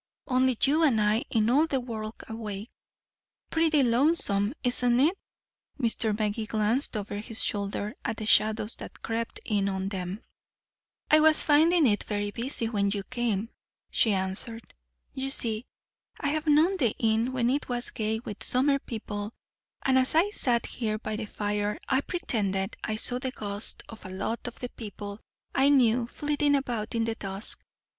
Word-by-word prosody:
"Only 255 Hz, -2 st, +2 dB
you 300 Hz, +4 st, +4 dB
and 270 Hz, -9 st, +4 dB
I 215 Hz, +5 st, +2 dB
in 220 Hz, -2 st, +2 dB
all 300 Hz, +5 st, +4 dB
the 270 Hz, -4 st, 0 dB
world 225 Hz, -3 st, -6 dB
awake." 220 Hz, -1 st, -6 dB, 0.8 s
"Pretty 320 Hz, -3 st, +3 dB
lonesome, 235 Hz, -4 st, +2 dB
isn't 245 Hz, -1 st, +2 dB
it?" 315 Hz, +8 st, +4 dB, 0.6 s
Mr. 225 Hz, -3 st, +1 dB
Magee 215 Hz, 0 st, -1 dB
glanced 220 Hz, +4 st, +1 dB
over 205 Hz, 0 st, -4 dB
his 220 Hz, +1 st, -3 dB
shoulder 205 Hz, +1 st, -2 dB
at 225 Hz, -, -2 dB
the 215 Hz, -, -4 dB
shadows 215 Hz, +1 st, +3 dB
that -, -, -8 dB
crept 230 Hz, 0 st, -3 dB
in 200 Hz, -2 st, +1 dB
on 190 Hz, 0 st, -2 dB
them. 190 Hz, +2 st, -5 dB, 0.9 s
"I 310 Hz, -, +8 dB
was 310 Hz, 0 st, +5 dB
finding 315 Hz, +2 st, +5 dB
it 210 Hz, -4 st, +2 dB
very 205 Hz, -1 st, -2 dB
busy 235 Hz, +1 st, -2 dB
when 200 Hz, -3 st, +1 dB
you 200 Hz, 0 st, -2 dB
came," 230 Hz, -4 st, -1 dB, 0.4 s
she 225 Hz, -, +3 dB
answered. 195 Hz, +4 st, -2 dB, 0.4 s
"You 270 Hz, 0 st, -3 dB
see, 230 Hz, -3 st, 0 dB, 0.5 s
I 285 Hz, -, 0 dB
have 310 Hz, +1 st, -2 dB
known 315 Hz, +6 st, +4 dB
the 245 Hz, -, +1 dB
inn 225 Hz, +2 st, +1 dB
when 250 Hz, -1 st, +1 dB
it 280 Hz, 0 st, -1 dB
was 245 Hz, 0 st, -2 dB
gay 220 Hz, -1 st, -1 dB
with 210 Hz, -4 st, -8 dB
summer 275 Hz, +2 st, +3 dB
people, 210 Hz, -4 st, -5 dB, 0.5 s
and 260 Hz, -1 st, +4 dB
as 260 Hz, +3 st, +1 dB
I 365 Hz, +6 st, +4 dB
sat 240 Hz, -, +1 dB
here 215 Hz, -3 st, -2 dB
by 215 Hz, 0 st, -4 dB
the 215 Hz, +1 st, -4 dB
fire 205 Hz, 0 st, -2 dB
I 265 Hz, 0 st, +2 dB
pretended 210 Hz, -, -1 dB
I 215 Hz, -, -1 dB
saw 245 Hz, +3 st, 0 dB
the 260 Hz, 0 st, -2 dB
ghosts 205 Hz, -4 st, -1 dB
of 225 Hz, -, -11 dB
a 185 Hz, -, -8 dB
lot 200 Hz, +6 st, -3 dB
of 240 Hz, -, -7 dB
the 245 Hz, -, -5 dB
people 205 Hz, -2 st, -8 dB, 0.3 s
I 270 Hz, +1 st, +4 dB
knew 245 Hz, -4 st, +4 dB
flitting 290 Hz, +1 st, +1 dB
about 240 Hz, -4 st, -2 dB
in 230 Hz, -, +1 dB
the 225 Hz, 0 st, -1 dB
dusk. 195 Hz, -1 st, -4 dB
230 Hz, 170 wpm, -28 LUFS, 210-265 Hz, 0.9 s, I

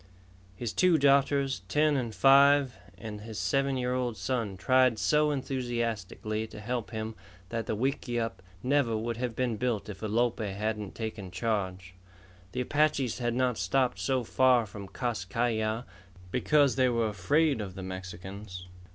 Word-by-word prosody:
His 115 Hz, +3 st, -4 dB
two 180 Hz, -3 st, +4 dB
daughters, 140 Hz, -2 st, +3 dB
ten 150 Hz, +6 st, +3 dB
and 120 Hz, -5 st, -2 dB
five, 140 Hz, -1 st, +6 dB, 0.2 s
and 105 Hz, 0 st, -7 dB
his 110 Hz, 0 st, -8 dB
seven 135 Hz, -1 st, +1 dB
year 125 Hz, 0 st, -1 dB
old 125 Hz, -3 st, -1 dB
son 115 Hz, -7 st, -2 dB
tried 130 Hz, +2 st, +3 dB
so 150 Hz, +4 st, +3 dB
enthusiastically 115 Hz, -6 st, -2 dB
to 105 Hz, -, -10 dB
help 120 Hz, +1 st, -3 dB
him 110 Hz, 0 st, -4 dB, 0.4 s
that 115 Hz, -1 st, -3 dB
the -, -, -1 dB
wickiup 120 Hz, -3 st, -2 dB, 0.2 s
never 130 Hz, -4 st, +2 dB
would 115 Hz, +1 st, -3 dB
have 120 Hz, -2 st, -3 dB
been 120 Hz, -3 st, -1 dB
built 110 Hz, -3 st, -1 dB
if 100 Hz, -2 st, -8 dB
Alope 115 Hz, +3 st, +1 dB
hadn't 105 Hz, 0 st, -3 dB
taken 110 Hz, -4 st, -5 dB
charge. 95 Hz, -2 st, -2 dB, 0.6 s
The -, -, -1 dB
Apaches 140 Hz, -3 st, +1 dB
had 120 Hz, -1 st, -1 dB
not 125 Hz, -2 st, +1 dB
stopped 130 Hz, -2 st, +1 dB
so 130 Hz, -2 st, 0 dB
far 125 Hz, 0 st, +3 dB
from 100 Hz, -1 st, -9 dB
Kas 120 Hz, -3 st, -3 dB
Kai 115 Hz, +6 st, 0 dB
Ya 110 Hz, +1 st, -1 dB, 0.5 s
because 140 Hz, +2 st, +3 dB
they 130 Hz, -1 st, +4 dB
were 115 Hz, -2 st, +1 dB
afraid 135 Hz, -, +1 dB
of 95 Hz, -3 st, -6 dB
the 95 Hz, -, -6 dB
Mexicans. 95 Hz, +1 st, -7 dB
120 Hz, 155 wpm, -29 LUFS, 105-130 Hz, 0.6 s, five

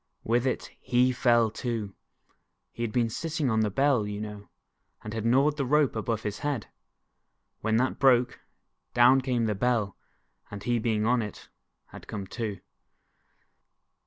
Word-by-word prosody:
With 120 Hz, +3 st, +1 dB
it, -, -, -2 dB
he 125 Hz, +1 st, +2 dB
fell 120 Hz, -2 st, +3 dB
too! 110 Hz, -4 st, -4 dB, 0.8 s
He -, -, -9 dB
had 115 Hz, -2 st, -1 dB
been 115 Hz, 0 st, +1 dB
sitting 155 Hz, -1 st, -2 dB
on 110 Hz, -, +2 dB
the 110 Hz, -1 st, +2 dB
Bell, 135 Hz, -1 st, +2 dB
you 105 Hz, 0 st, -4 dB
know, 105 Hz, -2 st, -7 dB, 0.5 s
and 105 Hz, -, -6 dB
had 110 Hz, 0 st, -2 dB
gnawed 140 Hz, +5 st, +3 dB
the 140 Hz, -, 0 dB
rope 145 Hz, 0 st, +2 dB
above 110 Hz, 0 st, -2 dB
his 105 Hz, -1 st, -4 dB
head. 145 Hz, -7 st, -2 dB, 0.9 s
When 110 Hz, +1 st, +1 dB
that 130 Hz, +2 st, 0 dB
broke, 125 Hz, -3 st, +3 dB, 0.6 s
down 125 Hz, +2 st, +6 dB
came 125 Hz, -3 st, 0 dB
the 110 Hz, -, +1 dB
Bell, 105 Hz, -2 st, 0 dB, 0.5 s
and 100 Hz, 0 st, -8 dB
he 120 Hz, +1 st, +1 dB
being 110 Hz, -1 st, 0 dB
on 120 Hz, +1 st, +3 dB
it. 105 Hz, -2 st, -8 dB, 0.4 s
had -, -, -11 dB
to -, -, -18 dB
come 105 Hz, -3 st, -5 dB
too. 105 Hz, -3 st, -5 dB
115 Hz, 160 wpm, -28 LUFS, 105-125 Hz, 0.9 s, down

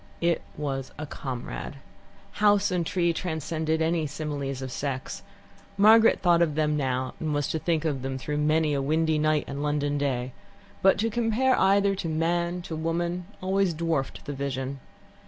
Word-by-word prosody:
It 170 Hz, -1 st, +2 dB, 0.2 s
was 135 Hz, -3 st, -3 dB
a 155 Hz, -, -4 dB
comrade. 130 Hz, 0 st, -6 dB, 0.7 s
House 205 Hz, -1 st, +4 dB
and 180 Hz, -2 st, +1 dB
tree 170 Hz, 0 st, +1 dB
transcended 160 Hz, -1 st, -1 dB
any 160 Hz, -1 st, +1 dB
similes 140 Hz, -2 st, -4 dB
of 130 Hz, -, -5 dB
sex. 135 Hz, 0 st, -4 dB, 0.6 s
Margaret 220 Hz, +3 st, +6 dB
thought 175 Hz, -2 st, +4 dB
of 155 Hz, -4 st, +2 dB
them 150 Hz, -1 st, +1 dB
now, 130 Hz, -2 st, -1 dB
and 155 Hz, -2 st, -1 dB
was 145 Hz, -1 st, 0 dB
to 160 Hz, -, -1 dB
think 165 Hz, -1 st, 0 dB
of 140 Hz, -4 st, -1 dB
them 135 Hz, 0 st, -3 dB
through 150 Hz, +3 st, -3 dB
many 155 Hz, 0 st, +2 dB
a 140 Hz, -, 0 dB
windy 155 Hz, +2 st, +1 dB
night 155 Hz, 0 st, +2 dB
and 140 Hz, +1 st, -5 dB
London 145 Hz, -1 st, 0 dB
day, 130 Hz, -3 st, -1 dB, 0.5 s
but 195 Hz, -, +5 dB
to 225 Hz, +1 st, 0 dB
compare 240 Hz, +3 st, +2 dB
either 195 Hz, +1 st, +4 dB
to 185 Hz, -4 st, -3 dB
man, 170 Hz, +2 st, 0 dB
to 165 Hz, -, -5 dB
woman, 170 Hz, +2 st, -2 dB, 0.2 s
always 190 Hz, -2 st, +1 dB
dwarfed 160 Hz, -4 st, -2 dB
the 145 Hz, -, -4 dB
vision. 135 Hz, 0 st, -3 dB
155 Hz, 170 wpm, -27 LUFS, 140-175 Hz, 0.7 s, Margaret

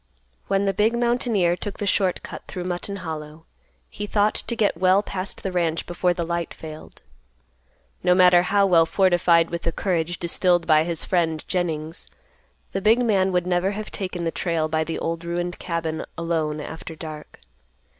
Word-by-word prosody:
When 195 Hz, 0 st, +1 dB
the 195 Hz, -, +1 dB
big 220 Hz, +5 st, +2 dB
mountaineer 235 Hz, -7 st, +2 dB
took 195 Hz, +2 st, -5 dB
the 205 Hz, -, -3 dB
short 190 Hz, -2 st, +1 dB
cut -, -, -7 dB
through 180 Hz, -, -5 dB
Mutton 180 Hz, +2 st, -3 dB
Hollow, 155 Hz, 0 st, -7 dB, 0.4 s
he 205 Hz, -, -6 dB
thought 210 Hz, 0 st, +2 dB
to 235 Hz, -, -3 dB
get 210 Hz, -5 st, +2 dB
well 185 Hz, +2 st, +4 dB
past 190 Hz, -1 st, -4 dB
the 190 Hz, -, -2 dB
ranch 170 Hz, -2 st, 0 dB
before 175 Hz, +1 st, 0 dB
the 175 Hz, -1 st, -2 dB
light 170 Hz, 0 st, -3 dB
failed. 155 Hz, -, -10 dB, 1.0 s
No 180 Hz, -, +4 dB
matter 180 Hz, -1 st, +7 dB
how 200 Hz, +2 st, +3 dB
well 165 Hz, -4 st, +5 dB
fortified 175 Hz, -3 st, +3 dB
with 170 Hz, -, -3 dB
the 170 Hz, -, -1 dB
courage 175 Hz, -2 st, -1 dB
distilled 175 Hz, 0 st, +1 dB
by 155 Hz, -1 st, +4 dB
his 170 Hz, -2 st, -2 dB
friend, 165 Hz, -4 st, 0 dB
Jennings, 165 Hz, -2 st, -2 dB, 0.6 s
the 195 Hz, -, -2 dB
big 225 Hz, +4 st, +4 dB
man 190 Hz, -4 st, +2 dB
would 180 Hz, -1 st, +1 dB
never 180 Hz, +2 st, +1 dB
have 215 Hz, +1 st, -6 dB
taken 185 Hz, -3 st, -4 dB
the 165 Hz, -, 0 dB
trail 165 Hz, -3 st, -1 dB
by 160 Hz, 0 st, 0 dB
the 165 Hz, +1 st, -4 dB
old 165 Hz, 0 st, -3 dB
ruined 175 Hz, +1 st, -3 dB
cabin 165 Hz, -2 st, -3 dB
alone 160 Hz, -2 st, -1 dB
after 160 Hz, +2 st, -7 dB
dark. 155 Hz, -1 st, -9 dB
175 Hz, 175 wpm, -23 LUFS, 165-195 Hz, 1.0 s, matter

